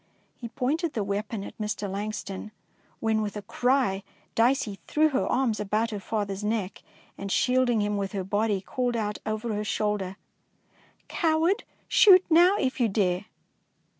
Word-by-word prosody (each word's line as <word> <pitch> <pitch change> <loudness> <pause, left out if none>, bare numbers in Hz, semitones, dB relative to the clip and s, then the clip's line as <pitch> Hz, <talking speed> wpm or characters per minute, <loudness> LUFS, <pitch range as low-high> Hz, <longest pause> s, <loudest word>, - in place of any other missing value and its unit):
He 235 - -7
pointed 295 +8 -1
the 215 - -1
weapon 200 +1 -3
at - - -9
Mr. 210 -1 -2
Lang 200 +2 -3
ston, 195 +1 -6 0.5
when 220 -1 +1
with 210 0 -3
a 205 - -6
cry 245 -6 +1 0.3
Dicey 225 -4 +1
threw 310 +1 +3
her 270 -2 0
arms 250 -4 +1
about 215 +3 0
her 210 - -4
father's 200 -1 -3
neck, 210 -3 -2 0.4
and, 195 0 -4
shielding 250 -2 +2
him 205 0 -1
with 195 -1 -2
her 195 -2 -2
body, 205 +1 0
called 245 +4 -2
out 210 -2 -2
over 215 +1 -2
her 210 0 -2
shoulder, 210 -3 -1 0.3
— - - -40
" - - -34
Coward, 330 +3 +1 0.2
shoot 400 -7 +7
now 350 +4 +6
if 260 0 -1
you 235 -3 +3
dare 190 -1 0
215 Hz, 165 wpm, -27 LUFS, 200-255 Hz, 0.5 s, shoot